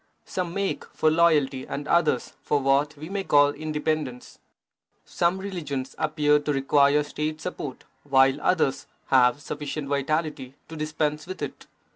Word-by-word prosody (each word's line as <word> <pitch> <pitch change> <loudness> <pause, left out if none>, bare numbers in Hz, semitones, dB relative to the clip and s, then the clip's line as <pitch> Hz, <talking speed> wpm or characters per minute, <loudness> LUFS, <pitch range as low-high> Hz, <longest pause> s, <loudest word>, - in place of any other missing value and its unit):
Some 180 -2 -3
make 200 0 -1
for 155 - +1
loyalty 150 -5 +2
and 145 +1 -5
others 155 -7 +1
for 145 - +1
what 140 +2 +1
we 155 +2 -8
may 195 +1 -3
call 145 -4 +5
independence. 150 -4 -3 0.7
Some 175 +2 0
religions 155 -9 -4
appear 150 -1 +2
to 150 0 -2
require 140 +1 +3
State 155 +1 -4
support, 150 -6 -6 0.2
while 135 0 +3
others 160 -7 +1 0.2
have 125 +2 +4
sufficient 145 0 -5
vitality 140 -1 -2
to 160 - -8
dispense 150 0 -2
with 185 - -6
it. - - -7
150 Hz, 140 wpm, -25 LUFS, 140-155 Hz, 0.7 s, call